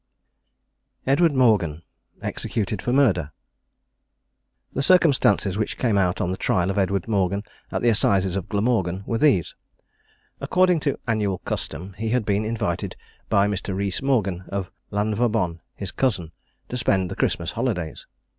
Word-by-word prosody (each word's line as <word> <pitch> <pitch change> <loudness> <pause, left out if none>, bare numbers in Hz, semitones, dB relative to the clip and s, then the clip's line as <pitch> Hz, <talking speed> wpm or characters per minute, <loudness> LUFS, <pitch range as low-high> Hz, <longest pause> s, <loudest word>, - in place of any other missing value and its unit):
EDWARD 145 +3 +3
MORGAN. 100 - +3 0.4
EXECUTED 105 -3 -2
FOR 120 - -1
MURDER. 100 - +3 1.4
The 135 - -1
circumstances 135 - +3
which 110 - -2
came 115 -5 +1
out 95 -2 +2
on 90 - 0
the 95 - -3
trial 90 +1 +1
of 95 - -1
Edward 100 0 0
Morgan, 100 -2 +1 0.3
at - - -2
the 120 - +5
assizes 95 -4 +2
of 95 -3 -4
Glamorgan, 100 -4 0
were 115 - -1
these: 130 - +3 0.9
According 180 -2 +3
to 140 -2 -1
annual 105 -4 0
custom, 90 +2 -5
he 110 0 -1
had 120 -1 +1
been 105 +1 +1
invited 110 -6 -2 0.3
by 100 0 +4
Mr. 100 -1 -2
Rees 100 -1 -1
Morgan, 105 -10 0
of 100 -2 -3 0.2
Lanvabon, 105 -4 0 0.2
his 100 -2 -5
cousin, 95 -11 -1 0.4
to 125 - -3
spend 95 -7 +1
the - - -4
Christmas - - 0
holidays. 90 - -3
100 Hz, 145 wpm, -24 LUFS, 95-120 Hz, 1.4 s, the